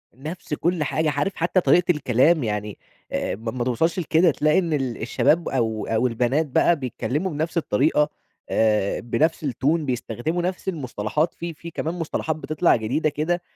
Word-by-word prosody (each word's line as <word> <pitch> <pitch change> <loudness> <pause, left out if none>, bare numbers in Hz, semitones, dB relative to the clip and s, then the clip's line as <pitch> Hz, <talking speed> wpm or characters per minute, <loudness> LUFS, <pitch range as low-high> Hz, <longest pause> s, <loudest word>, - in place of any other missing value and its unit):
نفس 155 +3 -7
كُلّ 170 +1 0
حاجة، 155 +2 0
عارف 145 +8 -1
حتى 175 +3 +1
طريقة 175 +1 +4
الكلام، 150 +1 +3
يعني 105 -1 -3 0.3
آآ - - -1
ما 115 +2 -5
ما 125 0 -2
توصلّش 160 +9 0
لكده، 165 0 +3
تلاقي 150 +5 +2
إن 170 -4 -1
ال 130 -5 -2
الشباب 155 +8 +2
أو 110 -5 -1
أو 115 +3 +2
البنات 125 +6 +1
بقى 150 +4 +3
بيتكلّموا 150 +5 -3
بنفس 160 +3 -2
الطريقة، 150 +1 +2 0.4
آآ 105 -3 +2
بنفس 155 +7 0
الTone 135 -1 -4
بيستخدموا 130 +3 -2
نفس 180 +2 -3
المُصطلحات، 150 - -1
في 170 -1 -6
في 170 +2 -10
كمان 160 +2 -3
مُصطلحات 160 -2 -2
بتطلع 155 +2 +2
جديدة 130 +8 0
كده 165 +4 -1
150 Hz, 165 wpm, -23 LUFS, 120-165 Hz, 0.4 s, طريقة